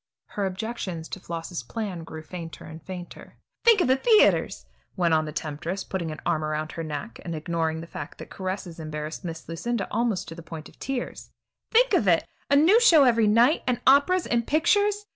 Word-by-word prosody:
Her 200 -2 -2
objections 190 -4 -5
to - - -6
Floss's 170 -1 -5
plan 185 - -5
grew 160 -1 -9
fainter 165 0 -8
and 160 +1 -10
fainter. 180 0 -9 0.3
"Think 460 -5 +6
of - - +2
the 260 - +5
theaters," 435 - +3 0.3
went 170 -3 +2
on 155 0 +3
the 155 - -5
temptress, 160 +5 -4
putting 175 -4 -4
an 155 - -6
arm 160 -3 +1
around 155 0 -2
her 165 - -5
neck, 145 -7 -6
and 170 -2 -4
ignoring 160 0 -2
the - - -7
fact 145 -3 -8
that - - -10
caresses 185 -3 -5
embarrassed 155 +1 -5
Miss 165 -2 -6
Lucinda 200 +5 -2
almost 230 -6 0
to - - -7
the 170 - -10
point 160 -1 -9
of - - -20
tears; 270 -2 -4 0.4
"think - - +4
of 235 - +3
it! 170 -2 +4 0.2
A 280 - +4
new 335 +10 +6
show 330 -11 +7
every 230 -4 +4
night, 235 +8 +4
and 250 -2 +1
operas 285 +7 +5
and 235 -1 0
pictures. 410 +7 +2
185 Hz, 200 wpm, -26 LUFS, 160-245 Hz, 0.4 s, show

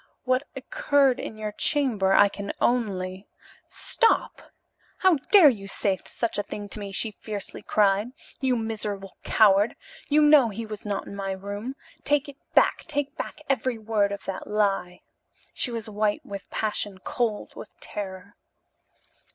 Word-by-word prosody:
What 255 +2 +1
occurred 270 0 +2
in 220 - -6
your 215 -1 -4
chamber 220 -5 +1
I 200 +1 +7
can 200 0 -5
only 195 -5 0 0.3
" - - -31 0.2
"Stop! 460 - +2 0.6
How 375 -4 +4
dare 375 -8 +9
you 200 -4 -8
say 195 -1 0
such 235 -3 -2
a - - +3
thing 205 0 -7
to 215 - -3
me?" 200 -1 -6
she 215 +3 -1
fiercely 210 -1 -6
cried. 205 0 +2 0.3
"You 260 -2 +2
miserable 210 -4 -4
coward! 205 0 +4 0.3
You 300 +1 +5
know 295 -5 +7
he 225 +2 -5
was 215 -1 -8
not 200 -1 -2
in - - -8
my 195 -1 -3
room. 205 +6 -6 0.3
Take 290 0 +2
it 280 -1 -10 0.2
back - - +5
take 290 -2 -1
back - - -6
every 255 -2 0
word 215 -2 +1
of 200 - -6
that 195 - -5
lie!" 195 -4 0 0.5
She - - -1
was 230 -2 -4
white 210 0 -1
with 200 -1 -8
passion, 210 -2 -2
cold 230 -4 -2
with - - -11
terror. 195 -1 -6
215 Hz, 160 wpm, -26 LUFS, 200-250 Hz, 0.6 s, dare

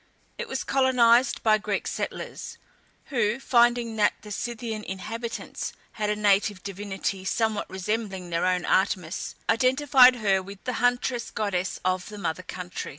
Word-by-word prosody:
It - - -3
was - - -3
colonized 250 -2 +3
by 215 -1 +4
Greek 205 -1 -2
settlers, - - -5 0.6
who, 235 -1 +1
finding 240 -3 +2
that 205 -1 +4
the 210 - -10
Scythian 225 0 -4
inhabitants 225 +5 -5 0.2
had 210 -1 -2
a 210 - +1
native 205 -2 +2
divinity 195 -1 -4
somewhat 220 +2 -1
resembling 190 -1 -3
their 170 +2 +1
own 180 -1 +1
Artemis, 185 -3 0
identified 255 +1 +5
her 200 -5 +2
with 200 +1 -11
the 250 - -2
huntress 245 0 +1
goddess 200 -3 -2
of 185 +1 0
the 210 - -9
mother 175 -2 -3
country. 180 -1 -6
210 Hz, 145 wpm, -26 LUFS, 190-235 Hz, 0.6 s, identified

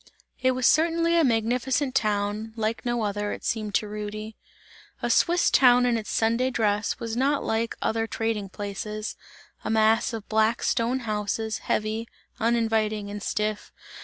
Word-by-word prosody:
It 260 0 +3
was 255 -1 -1
certainly 335 +3 +3
a 335 - +5
magnificent 250 +3 +1
town; 210 -1 -1
like 225 0 -2
no 240 -2 -1
other, 205 0 -2
it - - -8
seemed 215 -3 -2
to 210 - +1
Rudy. 210 +1 -6 0.7
A - - +1
Swiss 345 0 +3
town 250 -1 +6
in 245 -1 +2
its 220 -2 -4
Sunday 230 +3 +1
dress, 210 -3 0
was 230 -2 -4
not 275 +3 +1
like 225 +1 -1
other 225 0 0
trading 220 -3 -2
places, 210 +2 -5 0.5
a - - -3
mass 220 +2 +3
of 225 -3 -6
black 220 +2 +2
stone 250 +2 +1
houses, 215 0 -2
heavy, 215 +2 -2 0.3
uninviting 220 -3 0
and 205 0 -6
stiff. 210 0 -2
225 Hz, 155 wpm, -26 LUFS, 215-240 Hz, 0.7 s, town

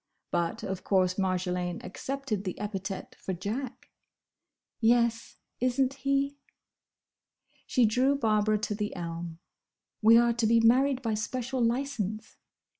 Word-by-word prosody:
But, 175 +7 -1
of 190 -2 -4
course 185 -1 +2
Marjolaine 180 -2 -1
accepted 265 -2 -4
the 185 -3 -4
epithet 195 -2 -5
for 190 - -4
Jack. 220 +8 -5 0.9
"Yes, 235 0 +2 0.2
is 250 +1 0
n't 265 0 +3
he?" 275 +1 0 1.3
She 250 -3 +3
drew 255 +6 +3
Barbara 215 -4 +2
to 210 0 -2
the 210 0 -3
elm. 170 -1 -5 0.6
"We 225 +1 +7
are 235 0 +4
to 230 -1 +1
be 230 +1 +5
married 260 +3 +3
by 225 -2 0
special 245 +4 -2
licence." 230 -4 -2
225 Hz, 125 wpm, -29 LUFS, 195-255 Hz, 1.3 s, We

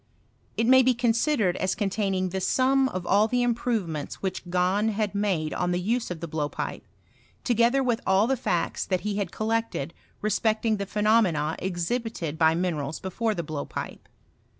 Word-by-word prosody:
It 230 - +2
may 260 +2 +7
be 255 -1 +3
considered 230 - +1
as 185 - 0
containing' 195 -3 -1
the 190 +1 -3
sum 265 +4 +3
of 185 -5 -5
all 205 +4 +4
the 245 +2 +1
Improvements 225 - -1
which 190 -2 -3
Gahn 185 +4 +2
had 210 -1 -1
made' 190 -7 0
cat 180 0 -1
the 175 - 0
use 230 +6 -1
of 170 -3 -6
the 170 - -4
blowpipe, 150 -2 -3 0.6
together 240 +3 +3
with 240 -3 0
bU 190 +2 +3
the 270 +3 +1
facts 180 -9 -1
that 185 -2 -1
he 205 -1 -2
had 200 -4 -1
collected 220 -9 -2 0.3
respecting 215 +1 +1
the 200 -1 -4
pheno 215 +3 +3
mena 155 -5 0
exhibited 180 -2 -3
by 160 0 +4
minerals 160 -4 -2
before 215 +4 -2
the 170 - -3
blowpipe. 150 -2 -6
200 Hz, 170 wpm, -26 LUFS, 175-230 Hz, 0.6 s, may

